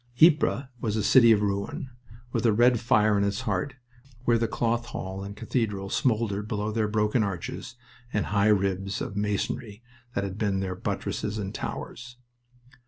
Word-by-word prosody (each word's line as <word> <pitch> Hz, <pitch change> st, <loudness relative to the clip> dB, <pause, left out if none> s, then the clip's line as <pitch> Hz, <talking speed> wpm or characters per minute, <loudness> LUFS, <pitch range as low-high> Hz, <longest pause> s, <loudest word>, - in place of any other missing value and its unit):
Ypres 155 Hz, -5 st, +5 dB, 0.2 s
was 110 Hz, -2 st, -1 dB
a 110 Hz, -, 0 dB
city 115 Hz, -3 st, +7 dB
of 105 Hz, -2 st, +4 dB
ruin, 105 Hz, -, -2 dB, 0.4 s
with -, -, -1 dB
a -, -, +5 dB
red 120 Hz, +2 st, +4 dB
fire 110 Hz, -2 st, +3 dB
in -, -, +2 dB
its 100 Hz, +4 st, -1 dB
heart 110 Hz, +2 st, -2 dB, 0.5 s
where 120 Hz, -1 st, +4 dB
the 115 Hz, -, +1 dB
Cloth 120 Hz, +1 st, -1 dB
Hall 95 Hz, -2 st, -5 dB
and 100 Hz, +1 st, -7 dB
cathedral 105 Hz, -4 st, -2 dB
smoldered 110 Hz, -5 st, 0 dB
below 105 Hz, -1 st, -2 dB
their 110 Hz, -1 st, 0 dB
broken 105 Hz, +2 st, +1 dB
arches 100 Hz, +4 st, -4 dB, 0.4 s
and 105 Hz, -, 0 dB
high 100 Hz, 0 st, +2 dB
ribs 95 Hz, -1 st, +1 dB
of 100 Hz, -, -4 dB
masonry 105 Hz, +2 st, -2 dB, 0.3 s
that 100 Hz, -, 0 dB
had 100 Hz, +1 st, -5 dB
been 100 Hz, -3 st, +1 dB
their 95 Hz, -1 st, -2 dB
buttresses 105 Hz, +3 st, -3 dB
and 100 Hz, -2 st, -4 dB
towers. 125 Hz, 0 st, -6 dB
105 Hz, 170 wpm, -27 LUFS, 100-115 Hz, 0.5 s, city